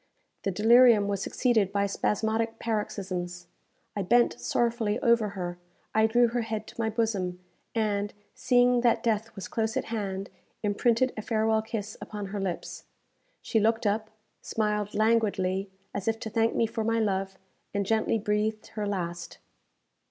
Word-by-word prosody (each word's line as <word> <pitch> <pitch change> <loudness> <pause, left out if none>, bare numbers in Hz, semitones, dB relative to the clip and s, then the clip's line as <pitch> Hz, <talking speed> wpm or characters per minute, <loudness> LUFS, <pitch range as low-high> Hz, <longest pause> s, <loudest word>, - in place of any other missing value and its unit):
The - - -1
delirium 225 +2 +6
was 200 -1 -1
succeeded 220 -6 +1
by 200 0 +1
spasmodic 220 +3 0
paroxysms. 185 -5 -3 0.5
I 205 - -1
bent 240 +6 +3
sorrowfully 230 -2 0
over 235 -3 +3
her; 175 -1 -4 0.3
I 220 0 +4
drew 240 +1 +4
her 240 +1 -1
head 220 -1 -3
to - - -6
my 220 - +1
bosom; 205 -5 -1 0.4
and, 205 -2 0 0.2
seeing 245 -1 +3
that 235 -1 +3
death 225 -1 0
was 190 -3 -6
close 220 -1 -1
at - - -1
hand, 195 -3 -3 0.3
imprinted 230 +4 +2
a - - -2
farewell 220 0 +1
kiss 220 -1 -5
upon 210 -1 -5
her 205 +1 -4
lips. 185 -3 -4 0.6
She 225 - +1
looked 225 +1 +2
up, 215 +1 0 0.3
smiled 210 -1 -1
languidly, 205 -4 +1 0.2
as 200 0 -4
if 225 0 +1
to 220 - -5
thank 225 0 +2
me 230 - +3
for 225 0 -3
my 230 +1 +1
love, 195 -2 -1 0.3
and 200 -1 -1
gently 220 +2 +1
breathed 215 0 -1
her 210 -1 -3
last. 175 -3 -4
215 Hz, 155 wpm, -28 LUFS, 200-225 Hz, 0.6 s, delirium